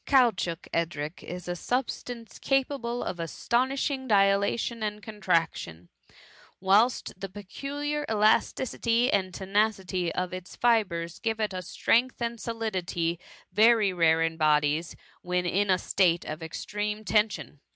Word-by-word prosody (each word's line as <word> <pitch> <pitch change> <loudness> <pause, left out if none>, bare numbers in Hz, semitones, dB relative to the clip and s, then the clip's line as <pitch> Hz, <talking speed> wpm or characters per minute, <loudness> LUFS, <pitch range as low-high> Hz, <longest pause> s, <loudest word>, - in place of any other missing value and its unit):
Caoutchouc, 225 - +2
Edric, 160 -1 -2
is 180 +1 -7
a 175 - -2
substance 245 +1 -4
capable 265 -3 0
of 180 - -4
astonishing 260 - -1
dilation 200 +2 +2
and 210 -1 -2
contraction; 165 - -1 0.7
whilst 205 +6 +3
the 195 +1 -6
peculiar 285 +10 -4
elasticity 230 +3 +2
and 190 -2 +1
tenacity 190 -2 0
of 180 0 -2
its 185 -1 -8
fibres 185 -9 +1
give 225 -1 -2
it 215 -2 -1
a 185 - -3
strength 235 +8 +1
and 235 -1 -3
solidity, 185 -7 -2 0.3
very 215 -1 +5
rare 165 -2 +3
in 165 0 -1
bo 155 -2 +4
dies 150 +3 -2 0.3
when 180 0 -1
in 195 +3 +1
a 185 - +5
state 175 -3 +1
of 155 +2 -6
extreme 210 +6 -4
tension. 210 -7 0
200 Hz, 130 wpm, -28 LUFS, 175-230 Hz, 0.7 s, very